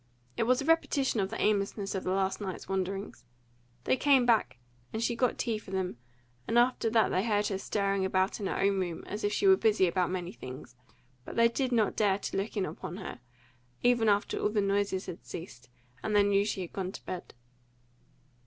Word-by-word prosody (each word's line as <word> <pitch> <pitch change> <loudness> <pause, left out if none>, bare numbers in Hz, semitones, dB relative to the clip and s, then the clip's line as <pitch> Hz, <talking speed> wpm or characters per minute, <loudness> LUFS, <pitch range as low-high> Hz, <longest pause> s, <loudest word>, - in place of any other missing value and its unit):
It 225 - 0
was 255 +2 +3
a - - -6
repetition 290 -6 +2
of 190 -1 0
the 225 - -5
aimlessness 200 -1 0
of 190 - -3
the - - -2
last 190 +1 0
night's 190 -3 -5
wanderings. 195 +1 -3 0.6
They - - +2
came 270 -2 +4
back, 230 - +2 0.3
and 220 +1 -2
she 235 - 0
got 245 0 +1
tea 225 -3 -1
for 210 - -14
them, 185 -8 -2 0.5
and 230 - +1
after 240 -1 +3
that 220 0 +3
they 185 - +1
heard 210 -2 +1
her 195 -2 -2
stirring 195 -1 0
about 190 +2 +1
in 200 - -2
her - - -2
own 195 0 +2
room, 175 -3 -3
as 210 +2 -5
if 205 - +1
she 395 - 0
were 380 -1 +7
busy 215 - +3
about 180 0 +1
many 180 -1 -3
things; 130 -7 -10 0.5
but - - -9
they 230 0 +6
did 255 +2 -1
not 225 -4 +2
dare 200 -3 +2
to 200 - -5
look 200 +3 -3
in 195 - +1
upon 160 +3 -6
her, 190 -10 -7 0.6
even 240 -3 +4
after 205 0 +1
all - - +1
the 210 0 0
noises 200 -1 0
had 175 - -8
ceased, 125 -7 -9 0.3
and 215 - -1
they 205 - +6
knew 200 0 +3
she 200 -2 -2
had 175 - -7
gone 190 -1 -3
to - - -10
bed. 180 -7 -6
200 Hz, 215 wpm, -30 LUFS, 190-225 Hz, 0.6 s, were